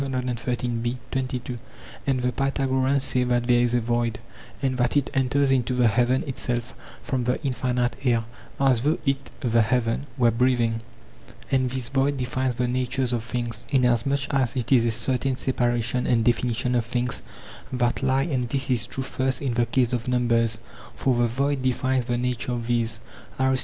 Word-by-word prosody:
And 135 -1 -3 2.1
the - - +1
Pythagoreans 135 0 +1
say 125 -2 +1
that 120 -1 +1
there 120 -1 +4
is 120 0 +2
a - - +4
void, 120 0 0 0.4
and 135 -2 0
that 125 +4 +2
it 140 - 0
enters 135 +1 +2
into 130 -1 +1
the 125 -1 +4
heaven 120 +4 +2
itself 125 -2 -3 0.3
from 130 -3 -1
the 125 - 0
infinite 125 -2 0
air, 120 -3 +2 0.4
as 130 -4 +4
though 150 +5 +2
it 135 0 -1
(the 115 -3 +3
heaven) 115 +4 0
were 120 -2 +4
breathing; 115 -1 +1 0.7
and 130 -1 +2
this 125 -1 -1
void 140 +1 +1
defines 130 0 -1
the 125 +1 0
natures 125 0 -1
of 115 -2 -1
things, 120 -1 -3
inasmuch 130 +1 +2
as 135 -3 +1
it 125 -1 -2
is 120 -3 +5
a - - +2
certain 125 +4 0
separation 120 -1 0
and 115 -2 +2
definition 120 0 +1
of 120 -1 +2
things 120 +1 -2 0.5
that 120 -1 0
lie 135 0 +2
together; 145 -6 -1
and 120 - -3
this 135 0 -1
is 120 -2 +1
true 130 - -3
first 130 -1 0
in 135 -4 -1
the 120 0 +1
case 125 0 +1
of 120 0 -2
numbers, 115 -2 +2 0.4
for 130 -2 +1
the 120 0 +3
void 135 +3 0
defines 130 0 +1
the 120 -1 -1
nature 125 0 -1
of 120 -1 -3
these. 115 -1 0
125 Hz, 175 wpm, -25 LUFS, 120-130 Hz, 2.1 s, is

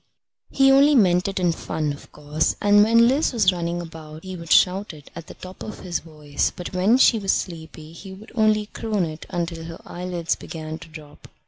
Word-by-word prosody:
He 270 0 +4
only 280 +2 +5
meant 180 -6 +3
it 195 -1 -3
in 175 -2 +2
fun, 155 -2 -3
of 145 - -14
course, 150 +1 -1
and 205 0 +5
when 230 +2 +5
Liz 275 +6 +2
was 205 -6 +3
running 170 0 -3
about 160 -2 -10
he 185 -1 -7
would 170 -2 -9
shout 190 -1 +3
it 145 -2 -16
at 170 -1 -9
the - - -11
top 185 0 -12
of 215 - -8
his 175 -2 -3
voice, 150 -3 -3
but 180 +2 -7
when 195 +7 +3
she 245 -3 +5
was 195 -2 0
sleepy 160 -2 -6
he 190 +3 -11
would 200 +4 -12
only 215 -2 +2
croon 210 -3 -2
it 155 0 -8
until 170 -1 -4
her 165 0 -9
eyelids 175 -1 -3
began 160 -1 -7
to 155 - -12
drop. 155 -2 -13
175 Hz, 210 wpm, -23 LUFS, 160-205 Hz, -, only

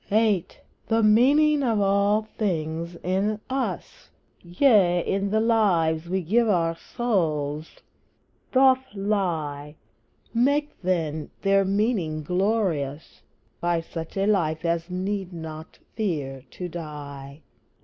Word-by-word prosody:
VIII. 210 -4 +2 0.4
The 225 0 +2
meaning 285 +8 +5
of 230 -5 +1
all 200 +2 +2
things 170 -6 -3
in 195 +4 0
us 265 0 -4 0.3
Yea, 180 -2 +3
in 195 +1 0
the 215 +2 +2
lives 175 -8 +2
we 190 0 -1
give 225 +7 +2
our 165 -4 +1
souls 160 -9 -2 0.8
doth 260 0 +5
lie; 165 -8 -2 0.6
Make, 285 +5 +2
then, 160 -5 -1
their 195 0 +4
meaning 195 -6 0
glorious 180 -6 -1 0.4
By 175 -1 +1
such 165 +2 -7
a 195 - +1
life 170 -6 +1
as 170 +1 -1
need 190 +1 -3
not 160 -1 -8 0.2
fear 145 - -3
to 180 - -6
die! 145 -4 -8
185 Hz, 110 wpm, -25 LUFS, 160-215 Hz, 0.8 s, meaning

